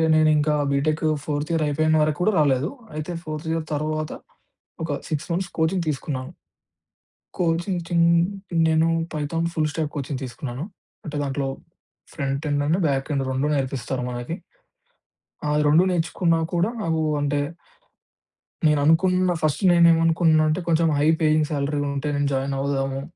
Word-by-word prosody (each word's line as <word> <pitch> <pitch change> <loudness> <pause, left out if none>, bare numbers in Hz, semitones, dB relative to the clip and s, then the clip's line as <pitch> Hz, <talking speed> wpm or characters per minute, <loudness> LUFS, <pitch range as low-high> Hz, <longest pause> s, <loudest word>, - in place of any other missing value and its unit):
నేనింకా 155 -1 +3 0.2
BTech 155 +3 0 0.2
fourth 150 +1 -2
year 160 -1 +1
అయిపోయిన 155 +2 +2
వరకు 150 0 0
కూడా 215 - +3
రాలేదు. 140 +2 +2 0.3
అయితే 155 +3 -4
ఫోర్త్ 155 0 -6
ఇయర్ 165 -1 -1
తరువాత 155 +1 -2 0.7
ఒక 160 - -3 0.2
6 155 -1 -2
మంత్స్ 180 +1 -1
కోచింగ్ 170 +2 +1
తీసుకున్నాను. 135 0 -4 1.1
కోచింగ్ 175 +2 0
చిన్ 170 -1 +3 0.6
నేను 160 +1 +3 0.3
పైథాన్ 165 +3 -1
ఫుల్‌స్టాక్ 155 -1 -1
కోచింగ్ 140 -1 -3
తీసుకున్నాను. 125 +3 -6 0.4
అంటే 150 -1 -5
దాంట్లో 135 0 -2 0.7
front 140 +2 -2
end, 145 0 +1
and 175 +5 +2
back 135 +1 -1
end 135 -1 0
2 135 +3 0
నేర్పిస్తారు 130 -2 -2
మనకి. 120 +7 -4 1.1
ఆ! - - 0
అది 150 - +2
2 160 +5 +5
నేర్చుకున్నా 165 0 +1
కూడా 175 +5 +2
నాకు 160 -1 0 0.2
అంటే 145 0 0 1.3
నేననుకున్న 165 +5 +3
ఫస్ట్ 155 +5 0
నేను 170 -1 +6
ఏమనుకున్నానంటే 160 0 +3
కొంచెం 165 0 +3
హై 150 - +3
పేయింగ్ 155 -1 +3
సాలరీలుంటే 145 0 -1
నేను 145 0 +1
జాయినవుదాము. 135 0 -1
155 Hz, 130 wpm, -23 LUFS, 140-165 Hz, 1.3 s, నేను